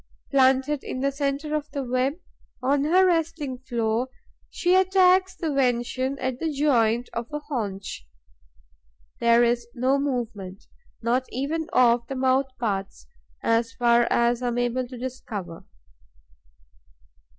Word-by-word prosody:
Planted 270 +1 +3
in 255 - -5
the 275 +1 +1
centre 280 +2 -2
of 300 0 -3
the 280 -1 -4
web, 255 +2 0 0.5
on 275 +2 +1
her 365 +5 +5
resting 325 -6 -1
floor, 235 -1 -1 0.4
she 355 +1 +1
attacks 375 0 +4
the 320 -4 -2
venison 255 +1 0
at 260 -2 -3
the 325 -1 -1
joint 245 -5 +2
of 235 +2 -5
a 295 - -2
haunch. 205 - -5 1.1
There 235 0 +5
is 235 0 +1
no 260 +3 +2
movement, 230 -9 -4 0.4
not 250 +3 +1
even 310 +5 -2
of 240 -1 +3
the 270 - -5
mouth 260 +1 +2
parts, 200 -4 -3 0.4
as 230 0 +1
far 240 -1 +3
as 235 +1 +2
I 250 - -1
am 240 0 -1
able 245 +1 0
to 250 0 -9
discover. 220 -9 -6
255 Hz, 135 wpm, -25 LUFS, 235-285 Hz, 1.1 s, her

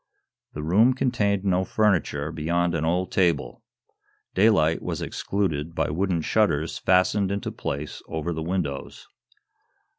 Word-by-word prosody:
The 75 - -5
room 110 +11 +4
contained 100 -7 0
no 95 -1 +2
furniture, 90 -8 0
beyond 85 +2 0
an 80 - -1
old 90 +3 0
table. 90 -3 0 0.7
Daylight 85 -6 +3
was - - -3
excluded 85 -5 -2
by 80 -2 0
wooden 90 +1 0
shutters 85 -8 +1
fastened 95 +2 +2
into 100 0 -3
place 70 +2 -5
over 80 +2 -3
the 80 - -4
windows. 80 -5 -4
85 Hz, 125 wpm, -25 LUFS, 80-100 Hz, 0.7 s, room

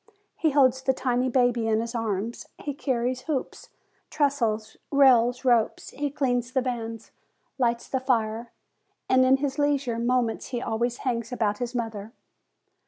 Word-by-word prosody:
He 320 - +1
holds 265 -3 +3
the 265 0 +2
tiny 250 0 0
baby 245 -2 +2
in 220 -1 +2
his 230 +1 -4
arms; 225 -1 -3
he 290 - -4
carries 255 -2 -1
hoops, 275 -4 -3 0.4
trestles, 230 -8 0
rails, 250 -3 +4
ropes; 240 -3 +2
he 290 0 -2
cleans 245 -3 -1
the 260 - +2
vans, 230 -3 -5 0.5
lights 235 -2 0
the 265 - -1
fire, 230 -3 -1 0.6
and 260 0 +4
in 260 +1 +5
his 280 +1 -3
leisure 280 -5 +1
moments 240 -1 0
he 245 - -3
always 235 +1 -1
hangs 235 -2 -1
about 210 -4 0
his 245 0 -4
mother. 225 -2 -4
245 Hz, 150 wpm, -26 LUFS, 230-265 Hz, 0.6 s, in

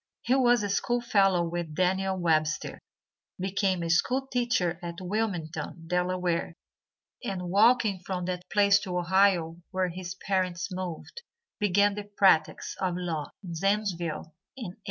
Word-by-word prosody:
He 250 - +2
was 245 -4 +4
a 205 - -1
school 240 +4 +1
fellow 195 -7 +3
with 170 -2 -4
Daniel 190 +2 +1
Webster, 155 -3 0 0.6
became 190 -1 0
a 165 - -3
school 255 +10 +2
teacher 240 -10 0
at 170 0 -6
Wilmington, 180 -4 -3
Delaware, 180 -1 -1 0.7
and 180 -6 -4
walking 215 -1 +4
from 180 0 -4
that 180 0 -4
place 200 -1 +5
to 180 -3 -4
Ohio, 175 -2 +2
where 185 -1 0
his 180 +1 -6
parents 185 -2 -1
moved, 185 - -6 0.4
began 205 0 +3
the 205 0 -7
practice 175 -6 +3
of 185 -2 0
law 165 -4 -3
in 175 -3 -6
Zanesville 175 -4 -1 0.2
in 230 -8 -5
1802. - - -27
185 Hz, 140 wpm, -28 LUFS, 175-200 Hz, 0.7 s, place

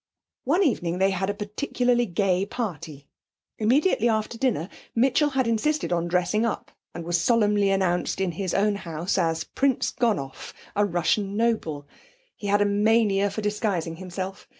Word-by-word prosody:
One 335 +9 +3
evening 180 - 0
they 190 +1 +3
had 190 0 -1
a - - 0
particularly 240 +3 0
gay 185 0 +1
party. 165 - -5 0.5
Immediately 240 - +3
after 220 +1 -1
dinner 230 - 0 0.3
Mitchell 265 +5 +3
had 265 -2 0
insisted 230 +2 0
on 170 0 0
dressing 180 +5 +1
up, 230 - -3 0.2
and 170 - -6
was 175 0 +1
solemnly 210 -1 +3
announced 185 -2 0
in 190 -2 0
his 185 +2 -3
own 205 0 +2
house 170 +1 -2
as 165 -2 0
Prince 270 -2 0
Gonoff, 205 - -2 0.2
a 205 0 +3
Russian 195 +3 0
noble. 165 -11 -1 0.5
He 205 - -6
had 205 +1 +3
a - - +1
mania 205 -1 +3
for 200 +2 -5
disguising 200 -6 -1
himself. 185 +1 -6
205 Hz, 155 wpm, -25 LUFS, 175-230 Hz, 0.5 s, One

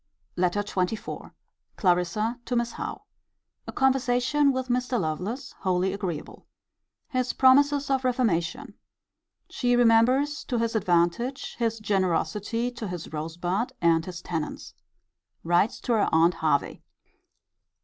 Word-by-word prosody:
LETTER 180 +3 +1
XXIV. 200 +1 -3 0.5
Clarissa 190 +6 +1
to 250 - -2
Miss 235 0 0
Howe. - - -6 0.6
A - - -4
conversation 265 +2 +2
with 260 -1 -3
Mr. 250 0 0
Lovelace 185 - -3
wholly 185 0 0
agreeable. 185 -7 -6 0.6
His 255 -1 -1
promises 285 +2 +4
of 265 -1 +1
reformation. 250 0 0 0.7
She 245 -1 0
remembers, 245 +5 +3
to 245 - -2
his 230 0 -1
advantage, 185 +7 0
his 230 -1 0
generosity 205 +3 -1
to 235 -3 -6
his 175 -3 -7
Rosebud 175 +8 -2
and 165 -1 +3
his 180 0 -8
tenants. 160 -3 -5 0.7
Writes 175 +6 +2
to 240 - 0
her 215 -3 +2
aunt 165 +2 +4
Hervey. 155 -3 0
220 Hz, 120 wpm, -26 LUFS, 175-250 Hz, 0.7 s, promises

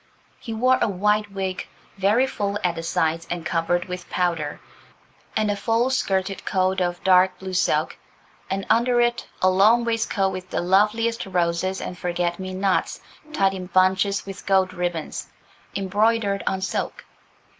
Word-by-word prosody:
He 235 - -7
wore 255 +4 +3
a - - +3
white 210 +1 +1
wig, 190 -1 -3 0.3
very 205 +6 +3
full 205 -6 -2
at 180 -2 +2
the 165 - -5
sides 165 0 -1
and 175 -1 -4
covered 175 +2 0
with 180 -1 -7
powder, 170 -5 -1 0.8
and 215 -1 +1
a - - -1
full 230 +5 +1
skirted 195 -6 -1
coat 190 -1 +1
of 175 0 -2
dark 185 0 +4
blue 190 0 -7
silk, 185 - +1 0.5
and 195 0 -2
under 240 +1 +3
it 240 0 +1 0.2
a 185 - +6
long 215 +6 +4
waistcoat 225 -4 0
with 185 0 -7
the - - -1
loveliest 215 +5 +2
roses 180 +1 0
and 180 - -6
forget 175 0 -1
me 185 0 -5
nots 190 0 0 0.3
tied 195 -9 +2
in 185 -1 -6
bunches 190 +2 +2
with 195 0 -9
gold 190 -1 +3
ribbons, 175 -3 -3 0.5
embroidered 205 +1 +1
on 190 0 0
silk. 190 - -3
190 Hz, 155 wpm, -23 LUFS, 180-210 Hz, 0.8 s, a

